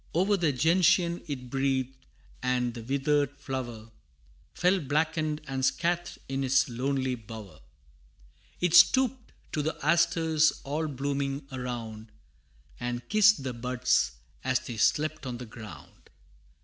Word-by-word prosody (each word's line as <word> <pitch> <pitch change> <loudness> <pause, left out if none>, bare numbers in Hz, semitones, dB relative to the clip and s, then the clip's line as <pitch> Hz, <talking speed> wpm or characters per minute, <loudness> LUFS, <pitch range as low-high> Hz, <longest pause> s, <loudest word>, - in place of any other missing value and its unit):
O'er 190 +4 +3
the 170 -6 +1
gentian 170 +4 +3
it 130 -4 -6
breathed, 135 -1 -1 0.3
and 125 -1 0
the 115 - -7
withered 140 +3 0
flower 120 -5 -6 0.6
Fell 185 +2 +2
blackened 155 +1 -1
and 135 -1 -3
scathed 175 +6 0
in 135 0 -2
its 135 0 +3
lonely 130 +1 -1
bower; 110 -4 -9 1.0
It 175 -2 +1
stooped 250 +7 +5 0.2
to 155 - -1
the 155 +2 -2
asters 165 -2 +3
all 155 +3 -2
blooming 140 0 -2
around, 115 -4 -6 0.7
And 120 0 -4
kissed 215 -6 +5
the 130 -2 -3
buds 120 - +1 0.3
as 130 0 +1
they 120 -3 -7
slept 155 +3 +1
on 125 -1 -4
the 125 - -7
ground. 110 - -12
135 Hz, 125 wpm, -28 LUFS, 125-160 Hz, 1.0 s, stooped